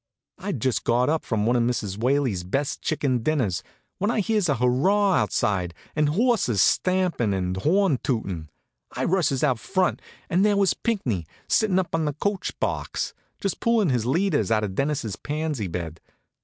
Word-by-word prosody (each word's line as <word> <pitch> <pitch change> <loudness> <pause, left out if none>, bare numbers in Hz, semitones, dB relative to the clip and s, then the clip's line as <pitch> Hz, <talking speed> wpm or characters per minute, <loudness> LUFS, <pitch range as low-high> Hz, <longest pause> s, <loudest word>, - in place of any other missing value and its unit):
I'd 195 -10 -3
just 130 +2 0
got 125 +3 +2
up 160 0 0
from 105 -2 -1
one 120 +2 +2
of 120 - +3
Mrs. 115 -5 -1
Whaley's 125 -6 +1
best 135 +11 -2
chicken 140 -5 0
dinners, 115 - 0 0.4
when 205 +3 +1
I 230 - +1
hears 210 -3 +1
a 145 - +3
hurrah 150 - +3
outside, 95 - 0 0.2
and 150 -1 +2
horses 200 - +2
stampin' 180 - +2
and 90 -1 -1
a - - -3
horn 175 - +2
tootin'. 95 - -3 0.4
I - - -2
rushes 155 -8 +1
out 130 -6 +2
front, 185 +4 0 0.3
and 180 +3 +2
there 205 -1 +3
was 195 -2 +3
Pinckney, 125 - -2 0.2
sittin' 210 -4 +2
up 185 -2 -1
on 165 -2 +1
a 145 - -1
coach 195 +6 -3
box, - - -2 0.3
just 195 - -2
pullin' 230 -6 +2
his 120 -3 0
leaders 165 - +1
out 110 -1 +2
of 100 -3 -3
Dennis's 135 -4 -1
pansy 150 -7 -3
bed. 85 -2 -5
140 Hz, 175 wpm, -25 LUFS, -, 0.4 s, of